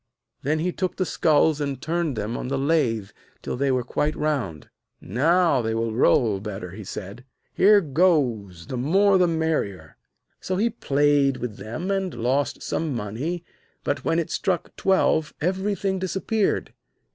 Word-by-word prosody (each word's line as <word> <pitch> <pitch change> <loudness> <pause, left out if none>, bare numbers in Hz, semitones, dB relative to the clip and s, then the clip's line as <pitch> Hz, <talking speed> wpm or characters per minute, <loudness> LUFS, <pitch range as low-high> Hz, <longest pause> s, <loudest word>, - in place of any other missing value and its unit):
Then 150 +3 0
he 175 +3 0
took 185 0 -2
the 185 - 0
skulls 155 -2 +2
and 140 -3 -2
turned 160 -1 -1
them 110 +2 -3
on - - -4
the 135 +1 -1
lathe 135 -8 +1 0.3
till - - -3
they 135 +2 +1
were 130 -1 +1
quite 150 +5 -1
round. 125 - -2 0.3
'Now 160 - +2
they 110 -1 -1
will 115 0 -1
roll 110 -1 +3
better,' 95 -3 -6
he 105 +4 -8
said. 100 +4 -7 0.3
'Here 205 +2 +6
goes! 130 - +1
The 130 - -5
more, 190 +9 +3
the 180 - +4
merrier!' 160 - -2 0.4
So 185 - -3
he 225 +5 +1
played 140 -4 +2
with 120 -4 -5
them, 120 - -4
and 190 -2 -1
lost 130 +5 -1
some 160 -5 -2
money, 120 - -3 0.4
but 145 0 -2
when 165 - +1
it 170 - -1
struck 185 -3 -1
twelve 175 -5 +2
everything 190 +3 -1
disappeared. 195 +3 -1
145 Hz, 155 wpm, -24 LUFS, 115-175 Hz, 0.4 s, Here